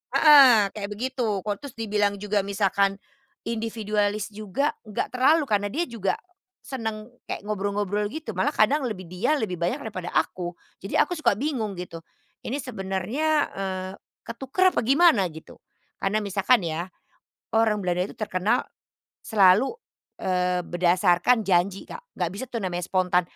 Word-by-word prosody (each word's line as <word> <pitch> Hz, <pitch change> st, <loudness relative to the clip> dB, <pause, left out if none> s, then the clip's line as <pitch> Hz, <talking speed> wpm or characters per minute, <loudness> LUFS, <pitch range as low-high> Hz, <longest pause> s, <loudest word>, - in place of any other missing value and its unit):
heeh, 260 Hz, -10 st, +7 dB
kayak 200 Hz, -2 st, -5 dB
begitu 220 Hz, -2 st, -2 dB
kok 205 Hz, -1 st, -1 dB
terus 285 Hz, -4 st, -10 dB
dibilang 210 Hz, -3 st, 0 dB
juga 205 Hz, +1 st, -1 dB
misalkan, 195 Hz, 0 st, +1 dB, 0.5 s
individualis 215 Hz, -2 st, -1 dB
juga, 215 Hz, +8 st, -1 dB, 0.2 s
nggak 210 Hz, -, -3 dB
terlalu 295 Hz, +5 st, +4 dB
karena 205 Hz, -3 st, +1 dB
dia 325 Hz, +10 st, -1 dB
juga 220 Hz, -6 st, -2 dB, 0.5 s
senang 225 Hz, -3 st, -5 dB, 0.2 s
kayak -, -, -5 dB
ngobrol-ngobrol 205 Hz, 0 st, -1 dB
gitu 270 Hz, -6 st, -6 dB
malah 185 Hz, +2 st, +1 dB
kadang 275 Hz, +8 st, +2 dB
lebih 185 Hz, -4 st, -6 dB
dia 195 Hz, -, 0 dB
lebih 215 Hz, -7 st, -2 dB
banyak 175 Hz, +1 st, 0 dB
daripada 185 Hz, -5 st, -5 dB
aku. 175 Hz, +1 st, -1 dB, 0.3 s
Jadi, 195 Hz, -, -2 dB
aku -, -, +3 dB
suka 310 Hz, -, +1 dB
bingung 235 Hz, -8 st, -2 dB
gitu 170 Hz, -2 st, -7 dB, 0.5 s
ini 270 Hz, -, -2 dB
sebenarnya, 215 Hz, -, -3 dB, 0.3 s
eee, 190 Hz, -1 st, -4 dB, 0.3 s
ketuker 270 Hz, +11 st, +1 dB
apa -, -, +1 dB
gimana 260 Hz, -, +4 dB
gitu. 160 Hz, 0 st, -13 dB, 0.4 s
Karena 200 Hz, +2 st, +1 dB
misalkan 200 Hz, +2 st, +2 dB
ya, 165 Hz, +3 st, -3 dB, 0.7 s
orang 220 Hz, -1 st, +3 dB
Belanda 180 Hz, -2 st, 0 dB
itu -, -, -13 dB
terkenal 215 Hz, +3 st, 0 dB, 0.6 s
selalu, 205 Hz, +3 st, +4 dB, 0.5 s
eee, 180 Hz, -1 st, 0 dB
berdasarkan 180 Hz, +5 st, +2 dB
janji 185 Hz, +1 st, +1 dB
Kak 485 Hz, -, -9 dB, 0.2 s
nggak 175 Hz, -2 st, 0 dB
bisa 235 Hz, -, -4 dB
tuh 235 Hz, -, -3 dB
namanya 180 Hz, -3 st, -3 dB
spontan, 180 Hz, -1 st, +2 dB
205 Hz, 145 wpm, -25 LUFS, 185-235 Hz, 0.7 s, heeh